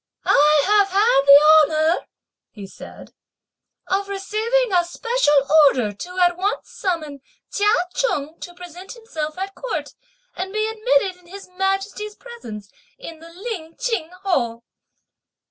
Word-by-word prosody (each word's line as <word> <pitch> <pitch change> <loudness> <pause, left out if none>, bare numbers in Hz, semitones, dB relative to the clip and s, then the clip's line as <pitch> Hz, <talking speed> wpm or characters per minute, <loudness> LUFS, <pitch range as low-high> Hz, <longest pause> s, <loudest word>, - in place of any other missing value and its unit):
"I 300 0 +4
have 410 0 +4
had 400 - +3
the 305 +2 +7 0.2
honour," - - -21 0.4
he 205 -3 -11
said, 195 - -13 0.7
"of 395 +1 -2
receiving 440 +5 -1
a 350 -1 +4
special 460 -1 0 0.3
order 245 -6 0
to 360 - -9
at 355 -1 +3
once 395 +3 -3
summon 310 -7 -4 0.3
Chia 415 +1 +2 0.2
Cheng 320 - -2
to 350 -1 -10
present 360 +1 -11
himself 325 -11 -6
at 385 +1 -5
Court - - -5 0.4
and 380 +1 -5
be 430 +1 -1
admitted 445 -3 0
in 355 -1 -23
His 390 +2 -11
Majesty's 390 +3 -3
presence 220 - -11 0.3
in 330 -10 -10
the 330 +1 -13
Lin 345 -3 -7
Ching 445 -10 -2
Hall." 235 -11 -1
370 Hz, 135 wpm, -21 LUFS, 315-425 Hz, 0.7 s, the